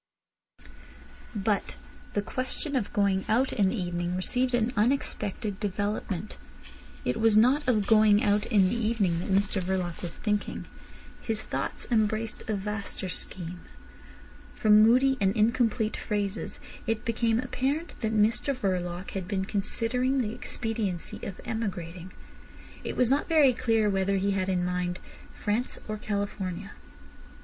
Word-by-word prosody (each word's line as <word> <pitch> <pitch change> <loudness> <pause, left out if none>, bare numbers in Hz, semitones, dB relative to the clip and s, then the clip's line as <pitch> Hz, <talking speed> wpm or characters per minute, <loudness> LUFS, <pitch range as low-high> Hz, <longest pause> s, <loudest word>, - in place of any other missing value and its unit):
But 205 0 0 0.4
the 205 - 0
question 260 +5 -3
of 240 -6 0
going 200 -2 +2
out 250 +5 +2
in 200 -3 +3
the 225 - -2
evening 175 0 -2
received 250 +7 +1
an 240 +1 +1
unexpected 210 -3 0
development. 205 -1 -3 0.7
It - - 0
was 225 -1 +4
not 260 +6 +4
of 215 -5 +3
going 215 -1 +5
out 205 0 +2
in 200 -5 +4
the - - -1
evening 215 -7 +1
that 175 - -4
Mr 195 0 +2
Verloc 180 -2 -2
was 170 -2 -5
thinking. 210 -1 -2 0.6
His 220 -2 -2
thoughts - - -3
embraced 220 0 +1
a 215 - +1
vaster 200 -1 -3
scheme. 180 -1 -5 0.9
From 215 -1 +6
moody 255 +4 +5
and 195 +1 +3
incomplete 225 0 +2
phrases 205 -1 -3 0.3
it 225 +1 -1
became 230 -1 +1
apparent 265 +6 -2
that 220 -2 0
Mr 220 +6 +2
Verloc 180 -4 -2
had 190 -2 -4
been 190 -1 -1
considering 230 +6 0
the 220 -3 -1
expediency 220 -8 -3
of 195 - -6
emigrating. 185 -6 -4 0.7
It - - -4
was 250 0 +3
not 285 +5 +1
very 300 -5 +6
clear 225 -2 +2
whether 195 0 +1
he 200 +1 +1
had 190 -1 0
in 185 -1 +1
his - - 0
mind 180 0 -2 0.4
France 220 +4 -1
or 215 0 -3
California. 200 -2 -3
210 Hz, 140 wpm, -28 LUFS, 190-230 Hz, 0.9 s, From